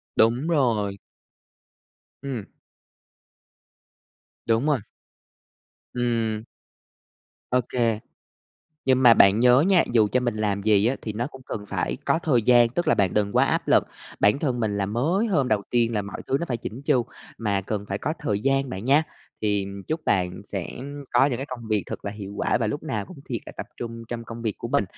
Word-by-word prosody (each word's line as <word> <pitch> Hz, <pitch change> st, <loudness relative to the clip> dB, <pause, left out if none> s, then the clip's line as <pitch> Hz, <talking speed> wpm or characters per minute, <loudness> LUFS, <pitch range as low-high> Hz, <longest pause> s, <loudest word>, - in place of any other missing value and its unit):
Đúng 120 Hz, +7 st, +3 dB
rồi! 115 Hz, -11 st, +1 dB, 1.3 s
Ừm. 130 Hz, -7 st, -4 dB, 2.0 s
Đúng 115 Hz, +3 st, +2 dB
rồi. 145 Hz, -4 st, +2 dB, 1.2 s
Ừm. 115 Hz, -3 st, 0 dB, 1.1 s
Ô 125 Hz, -, +3 dB
kê. 115 Hz, -3 st, +1 dB, 0.9 s
Nhưng 130 Hz, -1 st, +3 dB
mà 120 Hz, -2 st, +8 dB
bạn 100 Hz, 0 st, +6 dB
nhớ 125 Hz, +2 st, +6 dB
nha, 180 Hz, 0 st, +4 dB
dù 110 Hz, -3 st, +4 dB
cho 125 Hz, -, +3 dB
mình 120 Hz, -3 st, -1 dB
làm 100 Hz, -2 st, -1 dB
gì 105 Hz, 0 st, +4 dB
á 130 Hz, -, +1 dB
thì 110 Hz, -, -4 dB
nó 115 Hz, +3 st, -2 dB
cũng 135 Hz, -2 st, -12 dB
cần 105 Hz, -1 st, -5 dB
phải -, -, -2 dB
có -, -, +2 dB
thời 125 Hz, -7 st, +2 dB
gian, 120 Hz, +1 st, +6 dB
tức 175 Hz, +9 st, -2 dB
là -, -, +5 dB
bạn 95 Hz, -3 st, +1 dB
đừng 105 Hz, -1 st, +1 dB
quá -, -, +4 dB
áp -, -, -1 dB
lực -, -, +5 dB, 0.4 s
bản 105 Hz, +6 st, +4 dB
thân 130 Hz, -5 st, -1 dB
mình 105 Hz, -2 st, 0 dB
là 100 Hz, -1 st, 0 dB
mới 155 Hz, -, +1 dB
hôm 140 Hz, -, +1 dB
đầu 105 Hz, -2 st, +1 dB
tiên 120 Hz, -1 st, +2 dB
là 105 Hz, -, 0 dB
mọi 100 Hz, -, -7 dB
thứ 135 Hz, -, +1 dB
nó -, -, -1 dB
phải 120 Hz, -, 0 dB
chỉn 115 Hz, +3 st, -7 dB
chu, 125 Hz, -4 st, +2 dB, 0.3 s
mà 100 Hz, -3 st, 0 dB
cần 100 Hz, +1 st, -4 dB
phải 100 Hz, +1 st, -2 dB
có 155 Hz, -, -2 dB
thời 105 Hz, -11 st, -1 dB
gian 135 Hz, +2 st, +1 dB
bạn 95 Hz, +3 st, -5 dB
nha. 140 Hz, +5 st, +5 dB, 0.4 s
Thì 105 Hz, -2 st, +1 dB, 0.2 s
chúc 155 Hz, 0 st, -2 dB
bạn 90 Hz, -2 st, 0 dB
sẽ 95 Hz, -4 st, -4 dB, 0.5 s
có 120 Hz, +3 st, +5 dB
những 130 Hz, -4 st, -1 dB
cái 135 Hz, -, -5 dB
công 120 Hz, -3 st, -7 dB
việc 105 Hz, -3 st, +1 dB
thật -, -, -7 dB
là 100 Hz, -, -2 dB
hiệu 100 Hz, -1 st, -8 dB
quả -, -, +1 dB
và 110 Hz, -, +1 dB
lúc 145 Hz, +8 st, -3 dB
nào 110 Hz, -10 st, -3 dB
cũng 180 Hz, -, -12 dB
thiệt 120 Hz, -5 st, -2 dB
là -, -, -8 dB
tập -, -, -5 dB
trung 115 Hz, -1 st, -6 dB
trong 115 Hz, -1 st, -5 dB
công 115 Hz, 0 st, -8 dB
việc 110 Hz, -3 st, -1 dB
của -, -, -5 dB
mình, -, -, +2 dB
115 Hz, 200 wpm, -25 LUFS, 105-130 Hz, 2.0 s, mà